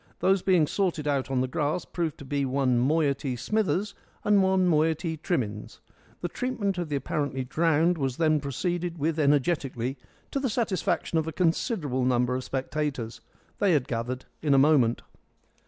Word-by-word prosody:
Those 190 0 +2
being 180 -5 +4
sorted 165 -3 -1
out 140 -3 0
on 130 -2 +1
the 130 - 0
grass 150 +6 -1
proved 165 -4 -3
to 140 - -10
be 140 +1 -1
one 130 -2 +1
moiety 140 -1 +1
Smithers 210 - 0 0.3
and 205 -1 +4
one 190 -1 +3
moiety 160 0 +1
Trimmins. 125 - -3 0.4
The 175 - -1
treatment 200 -2 -2
of 170 -3 -3
the 145 - -1
apparently 140 0 -2
drowned 165 +4 +2
was 135 -3 -1
then 155 -2 +3
proceeded 175 +5 -2
with 160 +1 -1
energetically, 140 -3 +1 0.3
to 275 - -1
the 270 - 0
great 220 - -3
satisfaction 190 -7 0
of 160 - -3
a - - -2
considerable 160 - 0
number 125 0 +2
of 130 0 -2
spectators. 130 -4 -3 0.4
They 200 -3 +3
had 140 -5 +1
gathered 125 +2 -3 0.2
in 145 -3 +3
a - - +5
moment. 135 -5 +4
150 Hz, 170 wpm, -27 LUFS, 130-175 Hz, 0.4 s, a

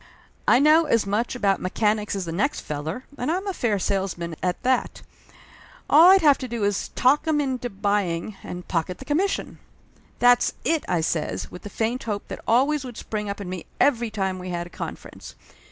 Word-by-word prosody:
I - - +6
know 305 +4 +5
as 230 -8 +2
much 215 +5 -1
about 200 -5 +1
mechanics 210 +2 0
as 195 -2 -3
the 165 - -4
next 245 - -1
feller, 155 - -5 0.2
and 250 +6 0
I'm 370 +4 -2
a 395 - -2
fair 230 - 0
salesman, 185 -4 -2
at 180 -1 -2
that! 255 0 0 0.8
All 325 +5 +8
I'd 380 -2 +6
have 290 -3 +5
to 255 - -4
do 235 -3 -3
is 200 -1 0
to - - -27
talk 285 +5 +3
'em 310 -2 +2
into 260 -3 -2
buying, 200 -2 -1
and 180 0 -8
pocket 175 +1 -2
the 265 - -11
commission 355 +8 -1 0.3
!" - - -34 0.2
"That's 245 0 +4
it 325 -1 +1
!" - - -12
I 175 -3 +1
says, 150 - -2
with 180 - -9
the 205 - -8
faint 230 +5 -2
hope 205 -3 -4
that - - -6
always 275 +5 +3
would 245 -3 -8
spring 210 -1 -4
up 200 - -4
in 200 - -6
me 180 -1 -6
every 240 -5 +3
time 190 -3 -2
we 180 0 -6
had 175 -1 -3
a 175 - -13
confer - - -7
ence. - - -12
215 Hz, 215 wpm, -24 LUFS, 185-260 Hz, 0.8 s, All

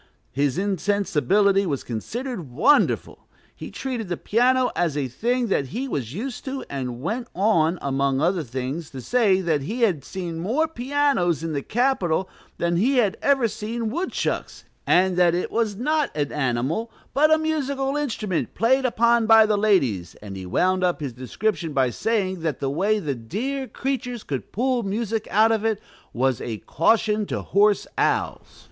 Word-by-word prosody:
His 140 +3 0
insensibility 200 0 +2
was 140 -5 -2
considered 200 - -5
wonderful. 225 - +2 0.3
He - - -8
treated 250 -6 -4
the 175 - -2
piano 250 +3 +2
as 165 -4 0
a 140 -2 -1
thing 240 - -1
that 140 -8 +1
he 250 - -4
was 130 - -3
used 245 - -5
to, 270 0 -4
and 125 -3 -4
went 230 - -3
on, 180 -4 +2
among 135 -1 0
other 175 +3 +1
things, 135 +4 -5
to 130 - -8
say 205 - +2
that 160 -5 0
he 225 - -4
had 175 - +2
seen 170 0 -5
more 250 - +1
pianos 265 - 0
in 165 -1 -3
the 140 - -1
"Capitol," 195 - 0 0.3
than 170 0 0
he 255 +8 +2
had 215 -4 +3
ever 270 -4 +3
seen 220 +2 -4
woodchucks, 345 +8 -3 0.2
and 185 0 +3
that 175 -1 +4
it 180 - -2
was 225 -3 0
not 300 +6 0
an 145 -1 -1
animal, 135 - -1 0.2
but 305 +3 +4
a 315 - +6
musical 280 -3 -1
instrument 220 - -2
played 260 +5 +2
upon 235 -1 +3
by 225 -1 +8
the 215 -1 +2
ladies; 135 - +1
and 100 -2 -9
he 95 -1 -7
wound 185 - +1
up 180 -1 +1
his 140 -5 -4
description 165 - -2
by 130 -3 +2
saying 190 - -1
that 160 -3 -2
the 135 -1 -1
way 200 +8 +1
"the 155 -9 -2
dear 235 - -4
creatures 250 -4 -3
could 135 -3 -5
pull 250 +2 0
music 220 +1 -2
out 220 +3 +4
of 220 -1 0
it 220 -2 0 0.3
was 130 -1 0
a 115 -2 -4
caution 215 +5 +2
to - - -3
hoarse 205 +1 +3
owls." - - -1
200 Hz, 170 wpm, -23 LUFS, 150-240 Hz, 0.3 s, by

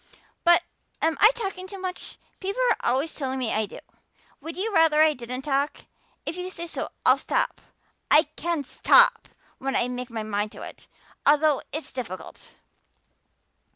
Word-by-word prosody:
But 345 0 +5 0.4
am 320 0 +1
I 430 - +9
talking 390 -5 -4
too 395 +1 -8
much? 370 -1 -5 0.2
People 400 +6 -1
are - - 0
always 275 +6 0
telling 265 -2 -3
me 250 -4 -1
I 215 -1 +1
do. - - -10 0.6
Would 320 +3 -8
you 420 +3 -2
rather 320 -2 +5
I 310 -1 +4
didn't 250 0 -6
talk? 280 +1 -1 0.4
If 310 - -3
you 360 +1 -4
say 340 -2 -5
so 335 - -4 0.2
I'll - - +6
stop. - - -1 0.5
I 305 - +7
can 335 -4 -2
stop 485 - +4 0.3
when 270 0 -2
I 240 - +2
make 250 0 -4
up 235 - -18
my 220 -1 -3
mind 210 0 -2
to - - -9
it, - - -11 0.4
although 295 0 +4
it's 310 +2 -5
difficult." 185 -9 -8
305 Hz, 170 wpm, -25 LUFS, 255-360 Hz, 0.6 s, I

